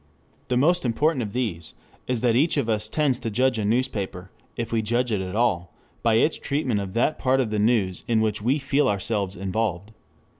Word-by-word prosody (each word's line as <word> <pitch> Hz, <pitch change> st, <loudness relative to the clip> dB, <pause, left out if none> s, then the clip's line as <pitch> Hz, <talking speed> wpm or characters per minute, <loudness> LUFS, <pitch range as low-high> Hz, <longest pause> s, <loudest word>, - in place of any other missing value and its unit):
The 125 Hz, -, +1 dB
most 175 Hz, +7 st, +3 dB
important 135 Hz, +4 st, +1 dB
of 105 Hz, -3 st, -4 dB
these 100 Hz, -9 st, -3 dB, 0.3 s
is 125 Hz, -3 st, -1 dB
that 120 Hz, -2 st, +2 dB
each 150 Hz, +5 st, +2 dB
of 135 Hz, -5 st, 0 dB
us 110 Hz, -2 st, 0 dB
tends 140 Hz, -5 st, 0 dB
to 115 Hz, -, -3 dB
judge 125 Hz, +2 st, +1 dB
a 105 Hz, -, -1 dB
newspaper, 100 Hz, -5 st, -2 dB, 0.3 s
if 115 Hz, -1 st, -3 dB
we 115 Hz, -1 st, +1 dB
judge 120 Hz, +3 st, 0 dB
it 105 Hz, -3 st, 0 dB
at 95 Hz, +1 st, -5 dB
all, 100 Hz, -7 st, 0 dB, 0.3 s
by 115 Hz, -1 st, +3 dB
its 150 Hz, +8 st, +2 dB
treatment 140 Hz, -7 st, -1 dB
of 95 Hz, 0 st, -6 dB
that 125 Hz, +6 st, +1 dB
part 130 Hz, 0 st, +2 dB
of 120 Hz, -5 st, 0 dB
the 105 Hz, -, 0 dB
news 105 Hz, -5 st, +1 dB
in 115 Hz, -2 st, +2 dB
which 110 Hz, -1 st, 0 dB
we 125 Hz, +7 st, +2 dB
feel 140 Hz, +1 st, +1 dB
ourselves 100 Hz, -1 st, -1 dB
involved. 100 Hz, +1 st, -2 dB
115 Hz, 210 wpm, -24 LUFS, 105-130 Hz, 0.3 s, most